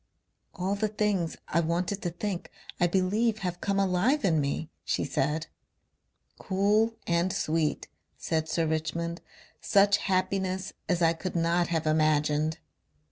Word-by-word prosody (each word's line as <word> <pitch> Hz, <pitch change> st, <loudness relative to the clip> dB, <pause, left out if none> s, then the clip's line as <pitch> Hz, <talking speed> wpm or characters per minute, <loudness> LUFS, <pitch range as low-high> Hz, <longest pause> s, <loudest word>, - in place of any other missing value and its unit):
"All 185 Hz, +2 st, -1 dB
the 210 Hz, +2 st, 0 dB
things 205 Hz, -5 st, -1 dB
I 165 Hz, -, +1 dB
wanted 175 Hz, +4 st, -1 dB
to 175 Hz, -, -1 dB
think 180 Hz, +1 st, -4 dB, 0.3 s
I 175 Hz, -, +4 dB
believe 205 Hz, +5 st, +1 dB
have 180 Hz, 0 st, -3 dB
come 200 Hz, 0 st, 0 dB
alive 195 Hz, +10 st, +2 dB
in 160 Hz, -5 st, +3 dB
me," 145 Hz, +3 st, -2 dB
she -, -, -1 dB
said.... 150 Hz, +4 st, -1 dB, 0.9 s
"Cool 210 Hz, +4 st, +2 dB
and 170 Hz, +2 st, +1 dB
sweet," 155 Hz, -2 st, 0 dB, 0.3 s
said 160 Hz, -1 st, -1 dB
Sir 165 Hz, +1 st, +1 dB
Richmond. 165 Hz, +2 st, -2 dB, 0.4 s
"Such 200 Hz, 0 st, +4 dB
happiness 185 Hz, -1 st, -1 dB, 0.2 s
as 175 Hz, -1 st, +2 dB
I 165 Hz, 0 st, +5 dB
could 175 Hz, +3 st, -5 dB
not 170 Hz, +1 st, +2 dB
have 160 Hz, -2 st, -1 dB
imagined." 155 Hz, 0 st, +2 dB
175 Hz, 135 wpm, -28 LUFS, 160-195 Hz, 0.9 s, I